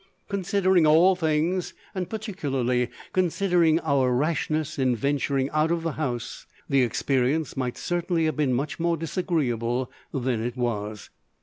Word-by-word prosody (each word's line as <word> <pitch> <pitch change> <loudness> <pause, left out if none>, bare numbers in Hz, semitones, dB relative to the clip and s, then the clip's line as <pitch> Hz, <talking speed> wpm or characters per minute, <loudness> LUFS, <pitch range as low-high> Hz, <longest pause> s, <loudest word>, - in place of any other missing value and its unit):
Considering 190 -3 +2
all 170 +5 +6
things, 165 +2 0 0.2
and 185 -3 -3
particularly 135 - -1 0.2
considering 175 -3 +3
our 140 -5 +2
rashness 155 +2 -1
in 130 -2 +2
venturing 140 +2 0
out 155 +1 +2
of 170 -1 0
the 165 - -1
house, 125 -7 -4 0.2
the 135 -1 +3
experience 135 +4 0
might 125 -2 -2
certainly 175 -1 0
have 155 - 0
been 150 -4 +1
much 140 +6 -2
more 170 0 +1
disagreeable 130 -8 -1 0.2
than 125 -4 -1
it 120 +1 -4
was. 105 -4 -3
155 Hz, 135 wpm, -25 LUFS, 125-170 Hz, 0.2 s, all